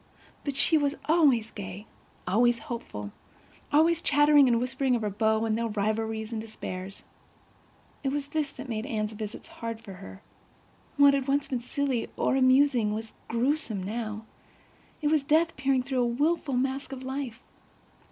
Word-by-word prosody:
But 285 Hz, -2 st, -3 dB
she 310 Hz, +3 st, +4 dB
was 285 Hz, 0 st, 0 dB
always 280 Hz, -9 st, +3 dB
gay, 195 Hz, +1 st, -7 dB, 0.4 s
always 235 Hz, +5 st, +3 dB
hopeful, 225 Hz, -, -6 dB, 0.6 s
always 325 Hz, +3 st, +4 dB
chattering 290 Hz, -2 st, +5 dB
and 235 Hz, -2 st, +3 dB
whispering 260 Hz, +1 st, 0 dB
of 230 Hz, -, -2 dB
her 210 Hz, -, -1 dB
beaux, 220 Hz, +2 st, +1 dB
and 220 Hz, -1 st, +1 dB
their 230 Hz, +1 st, -1 dB
rivalries 220 Hz, +1 st, -2 dB
and 220 Hz, -2 st, -3 dB
despairs. 195 Hz, -3 st, -7 dB, 1.0 s
It 270 Hz, -, +1 dB
was 285 Hz, 0 st, -3 dB
this 305 Hz, -2 st, -1 dB
that 265 Hz, +1 st, -8 dB
made 225 Hz, -1 st, -3 dB
Anne's 215 Hz, -1 st, -2 dB
visits 215 Hz, 0 st, -7 dB
hard 230 Hz, -1 st, -6 dB
for 215 Hz, -4 st, -10 dB
her. 95 Hz, -, -11 dB, 0.7 s
What 285 Hz, 0 st, +7 dB
had 275 Hz, -1 st, 0 dB
once 280 Hz, +1 st, +1 dB
been 255 Hz, -, -1 dB
silly 260 Hz, -1 st, -2 dB
or -, -, +1 dB
amusing 255 Hz, -4 st, +4 dB
was 220 Hz, 0 st, -5 dB
gruesome, 235 Hz, -4 st, 0 dB
now; 215 Hz, +1 st, -4 dB, 0.8 s
it 295 Hz, -, +3 dB
was 310 Hz, -1 st, +3 dB
death 320 Hz, +4 st, +2 dB
peering 265 Hz, -1 st, +1 dB
through 260 Hz, -1 st, -1 dB
a 240 Hz, -, +2 dB
wilful 285 Hz, +3 st, 0 dB
mask 265 Hz, +2 st, -1 dB
of 260 Hz, -1 st, -7 dB
life. 260 Hz, -3 st, -5 dB
245 Hz, 160 wpm, -28 LUFS, 220-280 Hz, 1.0 s, What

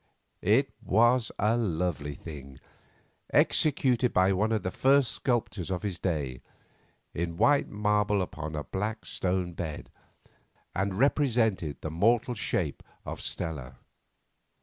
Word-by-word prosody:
It 130 Hz, +7 st, +3 dB
was 120 Hz, +3 st, +3 dB
a 110 Hz, +3 st, +2 dB
lovely 85 Hz, -9 st, -1 dB
thing, 70 Hz, -5 st, -10 dB, 0.7 s
executed 130 Hz, -5 st, +3 dB
by 95 Hz, +1 st, +3 dB
one 105 Hz, +4 st, +1 dB
of 110 Hz, -4 st, 0 dB
the 90 Hz, -, -2 dB
first 135 Hz, -1 st, +3 dB
sculptors 110 Hz, -8 st, -1 dB
of 90 Hz, -2 st, -2 dB
the 105 Hz, -, -1 dB
day, 75 Hz, -8 st, -3 dB, 0.7 s
in 85 Hz, 0 st, -3 dB
white 145 Hz, +7 st, +3 dB
marble 105 Hz, -1 st, +1 dB
upon 80 Hz, -3 st, -6 dB
a 75 Hz, -, -3 dB
black 105 Hz, +6 st, -4 dB
stone 90 Hz, -1 st, -1 dB
bed, 80 Hz, -3 st, -6 dB, 0.8 s
and 95 Hz, 0 st, -1 dB
represented 115 Hz, -, +2 dB
the 80 Hz, -, -4 dB
mortal 115 Hz, +8 st, +2 dB
shape 95 Hz, -8 st, -2 dB, 0.2 s
of -, -, -5 dB
Stella. 70 Hz, -7 st, -4 dB
95 Hz, 125 wpm, -28 LUFS, 80-115 Hz, 0.8 s, It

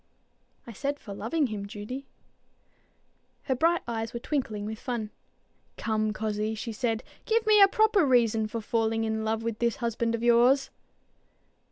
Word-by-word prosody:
"I 235 Hz, -, -9 dB
said 285 Hz, +7 st, -3 dB
for 200 Hz, -, -8 dB
loving 235 Hz, +10 st, 0 dB
him, 200 Hz, -1 st, -5 dB
Judy." 220 Hz, +7 st, -7 dB, 1.4 s
Her 265 Hz, -, 0 dB
bright 330 Hz, +6 st, +2 dB
eyes 225 Hz, -1 st, -3 dB
were -, -, -2 dB
twinkling 235 Hz, -7 st, -2 dB
with 220 Hz, +1 st, -5 dB
fun. 230 Hz, -4 st, -4 dB, 0.7 s
"Come, 215 Hz, -1 st, 0 dB
cozzie," 215 Hz, 0 st, -2 dB
she 230 Hz, +2 st, -5 dB
said, 225 Hz, 0 st, -1 dB, 0.2 s
"give 455 Hz, 0 st, +2 dB
me 425 Hz, -1 st, +6 dB
a 395 Hz, -, +10 dB
proper 435 Hz, -3 st, +3 dB
reason 230 Hz, -5 st, +3 dB
for 225 Hz, +1 st, -4 dB
falling 225 Hz, 0 st, 0 dB
in 220 Hz, 0 st, -1 dB
love 220 Hz, +1 st, -1 dB
with 230 Hz, -1 st, -3 dB
this 235 Hz, -2 st, +1 dB
husband 230 Hz, 0 st, -1 dB
of 230 Hz, -, -5 dB
yours." 240 Hz, +3 st, +4 dB
230 Hz, 160 wpm, -28 LUFS, 220-265 Hz, 1.4 s, a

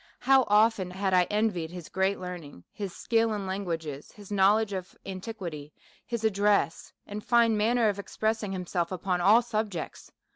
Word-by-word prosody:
" -, -, -41 dB
How 265 Hz, -2 st, +7 dB
often 210 Hz, -2 st, +3 dB
had 190 Hz, +1 st, -2 dB
I 180 Hz, -1 st, +5 dB
envied 205 Hz, -5 st, -1 dB
his 175 Hz, -2 st, -8 dB
great 190 Hz, +1 st, 0 dB
learning, 175 Hz, -, -8 dB
his 200 Hz, -3 st, -5 dB
skill 225 Hz, -1 st, +1 dB
in 200 Hz, -2 st, -4 dB
language, 190 Hz, -4 st, -3 dB
his 155 Hz, +8 st, -9 dB
knowledge 205 Hz, +2 st, +3 dB
of 185 Hz, -1 st, -6 dB
antiquity, 185 Hz, -7 st, -7 dB, 0.3 s
his 235 Hz, -2 st, -3 dB
ad 220 Hz, -, +2 dB
dress, 200 Hz, -3 st, +1 dB
and 210 Hz, +1 st, -7 dB
fine 235 Hz, -2 st, +4 dB
manner 225 Hz, +2 st, +2 dB
of 205 Hz, -1 st, -1 dB
expressing 215 Hz, 0 st, -2 dB
himself 180 Hz, -2 st, -2 dB
upon 180 Hz, -1 st, -1 dB
all 215 Hz, +6 st, +6 dB
subjects 215 Hz, -7 st, -4 dB
200 Hz, 170 wpm, -28 LUFS, 180-220 Hz, 0.3 s, How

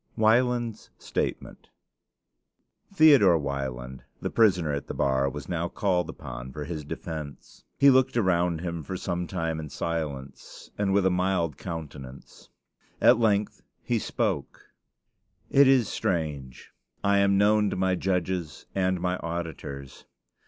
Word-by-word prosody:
WIELAND'S 120 Hz, 0 st, +1 dB
STATEMENT -, -, -4 dB, 1.2 s
Theodore 140 Hz, -, +6 dB
Wieland, 65 Hz, -3 st, -5 dB, 0.2 s
the -, -, -4 dB
prisoner 90 Hz, -9 st, +3 dB
at 70 Hz, -, -4 dB
the -, -, -5 dB
bar, 70 Hz, 0 st, +1 dB
was 75 Hz, -1 st, -8 dB
now 85 Hz, -1 st, -2 dB
called 90 Hz, -2 st, 0 dB
upon 65 Hz, 0 st, -8 dB
for 75 Hz, +2 st, -6 dB
his 80 Hz, 0 st, -5 dB
defense. 75 Hz, 0 st, -8 dB
He 140 Hz, 0 st, +7 dB
looked 130 Hz, -1 st, +3 dB
around 90 Hz, -5 st, +1 dB
him 85 Hz, -2 st, -4 dB
for 95 Hz, +5 st, -5 dB
some 90 Hz, -1 st, -3 dB
time 80 Hz, -3 st, -2 dB
in 75 Hz, -1 st, -6 dB
silence, 70 Hz, -4 st, -5 dB
and 100 Hz, -1 st, 0 dB
with 100 Hz, -1 st, +3 dB
a 95 Hz, -, +4 dB
mild 90 Hz, -4 st, 0 dB
countenance. 70 Hz, -7 st, -9 dB, 0.5 s
At 120 Hz, -1 st, +6 dB
length 105 Hz, -2 st, +1 dB, 0.2 s
he -, -, 0 dB
spoke: -, -, -3 dB, 0.8 s
It 140 Hz, 0 st, +6 dB
is 130 Hz, -5 st, +4 dB
strange: 75 Hz, -7 st, -3 dB, 0.3 s
I 100 Hz, 0 st, +3 dB
am 100 Hz, 0 st, +3 dB
known 105 Hz, +1 st, +4 dB
to -, -, -3 dB
my 95 Hz, 0 st, +1 dB
judges 90 Hz, -4 st, -2 dB
and 95 Hz, -1 st, 0 dB
my 90 Hz, +1 st, -1 dB
auditors. 80 Hz, -5 st, -6 dB
85 Hz, 135 wpm, -27 LUFS, 75-100 Hz, 1.2 s, He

